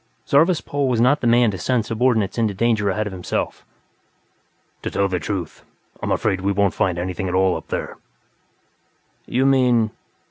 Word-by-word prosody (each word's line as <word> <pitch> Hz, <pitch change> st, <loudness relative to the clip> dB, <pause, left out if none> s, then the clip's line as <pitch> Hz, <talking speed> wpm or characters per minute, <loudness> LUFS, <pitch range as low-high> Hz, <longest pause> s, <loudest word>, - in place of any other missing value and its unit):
Zarvas 160 Hz, +4 st, +3 dB
Pol 140 Hz, -1 st, -2 dB
was 125 Hz, -3 st, +1 dB
not 130 Hz, +5 st, +3 dB
the 120 Hz, -, 0 dB
man 120 Hz, -1 st, +4 dB
to 95 Hz, -, -6 dB
send 120 Hz, +1 st, 0 dB
subordinates 115 Hz, -3 st, 0 dB
into 110 Hz, -3 st, 0 dB
danger 110 Hz, -1 st, +1 dB
ahead 105 Hz, +3 st, -1 dB
of 105 Hz, -, -5 dB
himself. 90 Hz, -1 st, -3 dB, 1.2 s
"To -, -, -3 dB
tell 100 Hz, -, 0 dB
the 90 Hz, -2 st, -2 dB
truth, 90 Hz, -1 st, -5 dB, 0.4 s
I'm -, -, -2 dB
afraid 95 Hz, -3 st, 0 dB
we 100 Hz, +1 st, 0 dB
won't 100 Hz, -1 st, +1 dB
find 90 Hz, -2 st, 0 dB
anything 90 Hz, +2 st, -3 dB
at 90 Hz, -, -2 dB
all 95 Hz, -1 st, +3 dB
up -, -, -7 dB
there." -, -, -5 dB, 1.3 s
"You 130 Hz, +2 st, +1 dB
mean...?" 125 Hz, -5 st, +3 dB
110 Hz, 175 wpm, -21 LUFS, 95-125 Hz, 1.3 s, man